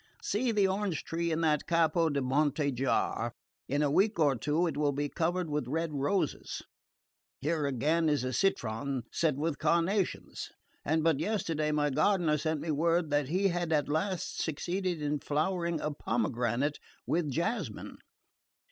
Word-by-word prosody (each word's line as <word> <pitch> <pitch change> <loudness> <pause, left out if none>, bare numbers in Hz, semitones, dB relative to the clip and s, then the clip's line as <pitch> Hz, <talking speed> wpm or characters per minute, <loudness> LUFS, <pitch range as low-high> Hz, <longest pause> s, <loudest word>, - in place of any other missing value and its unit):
See 235 +4 0
the 205 -3 +3
orange 190 -4 -1
tree 170 0 -2
in 160 +1 0
that 150 -3 +1
Capo 165 0 +3
di 140 -2 0
Monte 145 +2 +1
jar: 120 -2 0 0.4
in 145 +2 +1
a 145 - +2
week 200 +6 +3
or 145 -4 +3
two 150 +9 +1
it 160 -5 -1
will 145 -1 +1
be 145 +1 -1
covered 175 +3 -1
with 150 -4 -2
red 160 +3 -1
roses. 150 +4 -1 0.8
Here 150 +1 0
again 155 +5 +1
is 145 -4 +1
a 130 0 -2
citron 130 - 0
set 160 -4 +1
with 150 +1 -2
carnations; 170 +5 0 0.3
and 160 +1 +1
but 160 -4 +3
yesterday 160 -5 0
my 150 -1 +1
gardener 155 +1 +2
sent 155 0 -1
me 160 +1 -2
word 165 +1 +1
that 145 -2 +2
he 190 +6 +2
had 175 -2 -2
at 150 -2 +2
last 175 +5 -1
succeeded 175 +1 -2
in 145 0 0
flowering 170 +3 -1
a 150 - -2
pomegranate 120 +2 -1 0.3
with 160 -2 0
jasmine. 170 - -3
155 Hz, 160 wpm, -31 LUFS, 145-170 Hz, 0.8 s, the